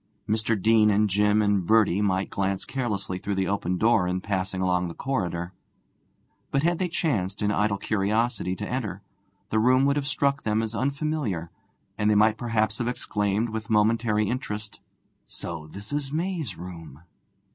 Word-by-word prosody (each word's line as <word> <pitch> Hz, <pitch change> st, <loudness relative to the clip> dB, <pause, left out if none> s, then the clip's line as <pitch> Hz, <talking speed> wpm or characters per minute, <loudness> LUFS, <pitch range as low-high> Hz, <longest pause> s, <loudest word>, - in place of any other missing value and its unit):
Mr. 110 Hz, 0 st, 0 dB
Deane 110 Hz, +1 st, +5 dB
and 105 Hz, 0 st, +2 dB
Jim 105 Hz, +2 st, +3 dB
and 100 Hz, -4 st, +1 dB
Bertie 105 Hz, -4 st, +4 dB
might 95 Hz, -1 st, 0 dB
glance 95 Hz, 0 st, -1 dB
carelessly 100 Hz, -8 st, -3 dB
through 100 Hz, +1 st, -2 dB
the 95 Hz, -1 st, 0 dB
open 90 Hz, -2 st, -1 dB
door 110 Hz, -3 st, +3 dB
in 90 Hz, +1 st, -1 dB
passing 95 Hz, -1 st, -2 dB
along 90 Hz, -1 st, +1 dB
the 85 Hz, -, -7 dB
corridor, 90 Hz, -9 st, -2 dB, 1.0 s
but 140 Hz, -, 0 dB
had 170 Hz, 0 st, +2 dB
they 185 Hz, -, +1 dB
chanced 110 Hz, -, -1 dB
in 105 Hz, -, +2 dB
idle 105 Hz, 0 st, +1 dB
curiosity 105 Hz, -1 st, 0 dB
to 105 Hz, +2 st, -5 dB
enter, 110 Hz, -6 st, -3 dB, 0.5 s
the 110 Hz, -, +2 dB
room 130 Hz, +4 st, +4 dB
would 140 Hz, +1 st, +2 dB
have 140 Hz, -1 st, -1 dB
struck 140 Hz, 0 st, +1 dB
them 110 Hz, +1 st, 0 dB
as 110 Hz, 0 st, -3 dB
unfamiliar, 135 Hz, -, -2 dB, 0.5 s
and 105 Hz, 0 st, +3 dB
they 105 Hz, -, +4 dB
might 110 Hz, +1 st, +4 dB
perhaps 110 Hz, -2 st, 0 dB
have 120 Hz, -, -1 dB
exclaimed 105 Hz, -2 st, -1 dB
with 110 Hz, -1 st, -5 dB
momentary 110 Hz, 0 st, +2 dB
interest, 105 Hz, -4 st, -4 dB, 0.5 s
'So 80 Hz, -3 st, -6 dB
this 100 Hz, -, -9 dB
is 145 Hz, -2 st, -2 dB
May's 160 Hz, -, -2 dB
room!' 80 Hz, -4 st, -9 dB
105 Hz, 170 wpm, -26 LUFS, 95-120 Hz, 1.0 s, Deane